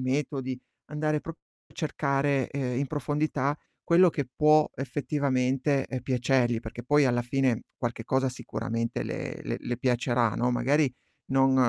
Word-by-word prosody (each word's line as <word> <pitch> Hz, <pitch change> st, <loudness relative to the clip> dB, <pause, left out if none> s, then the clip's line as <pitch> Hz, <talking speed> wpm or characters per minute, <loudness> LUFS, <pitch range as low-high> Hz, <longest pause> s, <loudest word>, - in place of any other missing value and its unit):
metodi, 130 Hz, -1 st, -2 dB, 0.3 s
andare 150 Hz, 0 st, -1 dB
prop 165 Hz, +2 st, -8 dB, 0.3 s
a -, -, -23 dB
cercare, 140 Hz, -3 st, 0 dB
ehm, 130 Hz, -3 st, -2 dB
in 140 Hz, -, 0 dB
profondità 145 Hz, 0 st, -1 dB, 0.3 s
quello 175 Hz, +2 st, +6 dB
che 145 Hz, -4 st, -2 dB
può 155 Hz, 0 st, +5 dB
effettivamente, 135 Hz, 0 st, 0 dB
uhm, 130 Hz, -, -2 dB
piacergli, 125 Hz, -1 st, +1 dB
perché 115 Hz, +1 st, -8 dB
poi 145 Hz, +2 st, +4 dB
alla 120 Hz, -1 st, +2 dB
fine 125 Hz, -1 st, +1 dB
qualche 115 Hz, -1 st, -3 dB
cosa 130 Hz, +2 st, +1 dB
sicuramente 115 Hz, -2 st, -3 dB
le -, -, -5 dB
le -, -, -3 dB
le 120 Hz, -, -3 dB
piacerà, 120 Hz, -3 st, +1 dB
no, 125 Hz, +1 st, +1 dB
magari 135 Hz, +3 st, +2 dB, 0.3 s
non 135 Hz, 0 st, +3 dB
135 Hz, 145 wpm, -28 LUFS, 125-145 Hz, 0.3 s, quello